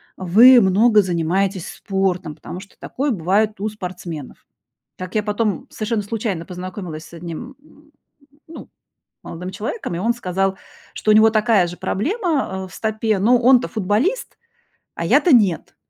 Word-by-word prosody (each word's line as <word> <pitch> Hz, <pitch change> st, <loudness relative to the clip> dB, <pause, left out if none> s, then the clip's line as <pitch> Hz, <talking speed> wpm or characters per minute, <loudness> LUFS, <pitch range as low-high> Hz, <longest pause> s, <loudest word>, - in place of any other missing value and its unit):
вы 230 Hz, +8 st, +6 dB
много 210 Hz, +3 st, +4 dB
занимаетесь 180 Hz, +1 st, -1 dB
спортом, 185 Hz, -5 st, -2 dB
потому 180 Hz, -, -9 dB
что 195 Hz, -, -15 dB
такое 280 Hz, +2 st, -3 dB
бывает 205 Hz, +2 st, 0 dB
у 215 Hz, -, -2 dB
спортсменов". 180 Hz, -8 st, -8 dB, 0.5 s
Как 185 Hz, +2 st, -7 dB
я 215 Hz, -, +1 dB
потом 210 Hz, -2 st, -2 dB
совершенно 215 Hz, -1 st, -2 dB
случайно 205 Hz, -5 st, -3 dB
познакомилась 180 Hz, -2 st, -7 dB
с -, -, -17 dB
одним, 170 Hz, -, -8 dB
м, 300 Hz, 0 st, -23 dB, 0.6 s
ну, 325 Hz, -, -11 dB, 0.6 s
молодым 180 Hz, +2 st, -7 dB
человеком, 210 Hz, -, -5 dB
и -, -, -3 dB
он 230 Hz, +4 st, +1 dB
сказал, 195 Hz, -3 st, -2 dB, 0.4 s
что 215 Hz, -, 0 dB
у -, -, +6 dB
него 220 Hz, +1 st, +6 dB
такая 215 Hz, -4 st, +2 dB
же 175 Hz, -, -8 dB
проблема, 270 Hz, -, -2 dB
э, -, -, -10 dB
в 185 Hz, -, -16 dB
стопе, 220 Hz, -1 st, -1 dB
но 235 Hz, +6 st, +4 dB
он-то 250 Hz, +1 st, +4 dB
футболист, 235 Hz, -, -1 dB, 0.6 s
а -, -, -4 dB
я-то 335 Hz, -8 st, +4 dB
нет, 200 Hz, -8 st, +1 dB
205 Hz, 150 wpm, -20 LUFS, 180-230 Hz, 0.6 s, вы